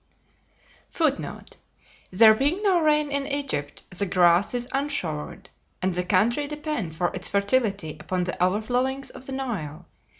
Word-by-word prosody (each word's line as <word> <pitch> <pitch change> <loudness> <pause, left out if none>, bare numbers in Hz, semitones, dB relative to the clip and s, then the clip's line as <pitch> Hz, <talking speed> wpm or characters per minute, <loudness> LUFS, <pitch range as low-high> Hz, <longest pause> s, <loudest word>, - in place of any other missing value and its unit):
[Footnote: 310 -4 -2 0.5
There 220 +4 +7
being 290 - 0
no 380 -4 +4
rain 300 -2 +2
in 280 0 -1
Egypt, 275 - -3
the 200 +2 0
grass 180 +4 +3
is 245 0 -3
"unshowered," 195 - -3 0.3
and 185 0 0
the 180 +1 -1
country 225 +10 +2
depend 295 - -4
for 175 +2 -1
its 185 -1 -2
fertility 200 - 0
upon 180 +4 -2
the 180 - -3
overflowings 245 +8 0
of 260 - -9
the - - -6
Nile. 180 - -4
220 Hz, 140 wpm, -25 LUFS, 180-280 Hz, 0.5 s, There